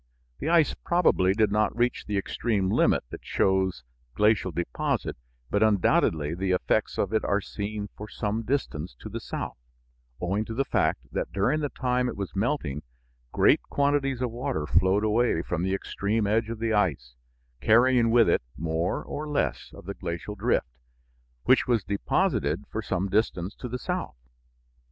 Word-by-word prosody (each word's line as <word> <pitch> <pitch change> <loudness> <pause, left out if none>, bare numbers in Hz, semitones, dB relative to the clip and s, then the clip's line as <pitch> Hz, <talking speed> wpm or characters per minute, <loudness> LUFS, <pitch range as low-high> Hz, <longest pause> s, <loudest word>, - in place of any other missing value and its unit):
The 155 - -2
ice 165 -3 +4
probably 100 - +2
did 110 -1 +2
not 105 +2 +1
reach 120 +1 0
the 105 -1 -1
extreme 100 -1 0
limit - - +3
that - - -8
shows 95 -1 +1 0.3
glacial 105 -2 +3
deposit, 85 -7 -2 0.4
but 100 - +1
undoubtedly 85 -7 +2
the 95 +1 0
effects 90 - 0
of 105 - -1
it 110 - +2
are 100 - +1
seen 105 +1 -5
for 105 - -8
some 110 +1 -2
distance 105 - -2
to - - -7
the - - -5
south, - - -5 0.6
owing 95 +4 0
to 110 - -6
the 135 +3 +1
fact - - +1
that - - -3
during 120 +11 +1
the 145 -2 -1
time 125 -1 0
it 115 - -6
was 100 -1 -5
melting 100 - -1 0.5
great - - +4
quantities 140 -2 +1
of 125 - -1
water 115 - -2
flowed 95 +6 +3
away 110 -5 +2
from 85 -1 -2
the 95 +2 0
extreme 105 +2 -1
edge 110 +2 +1
of 115 - -4
the 115 0 -1
ice, 70 - 0 0.5
carrying 120 +1 +5
with 115 0 +5
it - - +3 0.2
more 80 +2 -1
or 150 +1 -5
less 145 - -1
of - - -13
the - - -4
glacial 85 +5 -5
drift, 105 +4 +1 0.8
which 130 - +4
was 120 -5 +2
deposited 95 -4 0
for 110 - -2
some 95 -2 -1
distance 95 -2 0
to 125 - -7
the 125 - -3
south. 180 - -3
105 Hz, 170 wpm, -27 LUFS, 95-120 Hz, 0.8 s, carrying